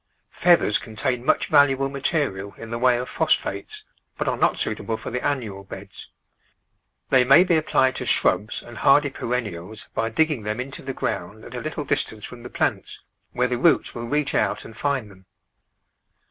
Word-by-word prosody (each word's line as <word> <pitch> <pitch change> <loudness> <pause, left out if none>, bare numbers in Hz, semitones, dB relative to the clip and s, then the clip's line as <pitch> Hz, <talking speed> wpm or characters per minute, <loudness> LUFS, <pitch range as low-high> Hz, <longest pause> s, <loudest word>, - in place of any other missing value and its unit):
Feathers 170 - +3
contain 120 +3 -3
much - - +2
valuable 135 -1 +4
ma 140 0 -6
terial 115 - -1
in 115 0 -9
the 115 - -3
way 125 0 +4
of 125 +1 -4
phosphates, - - -1 0.3
but - - -2
are - - +1
not - - +1
suitable 110 -1 0
for 110 - -7
the 125 +1 -3
annual 110 -9 -2
beds. 95 0 -9 1.0
They 130 -1 +6
may 135 +7 +7
be 180 -2 +2
applied 135 -4 +2
to - - -3
shrubs 105 +5 +2
and 120 -1 -11
hardy 140 0 +4
perennials 110 -6 -4
by 115 0 -1
digging 150 +1 +1
them 105 +2 -3
into 135 +2 -4
the 135 -1 -6
ground 105 +5 -4
at 120 - -11
a 125 - -5
little 155 -1 -4
distance 110 -5 +1
from 125 -1 -10
the 120 - -9
plants, - - -2 0.3
where 125 0 +1
the 125 -1 -2
roots 165 - +3
will 120 0 -6
reach 150 +2 0
out - - 0
and 115 - -11
find 135 -7 -2
them. 95 -1 -19
125 Hz, 185 wpm, -23 LUFS, 110-140 Hz, 1.0 s, may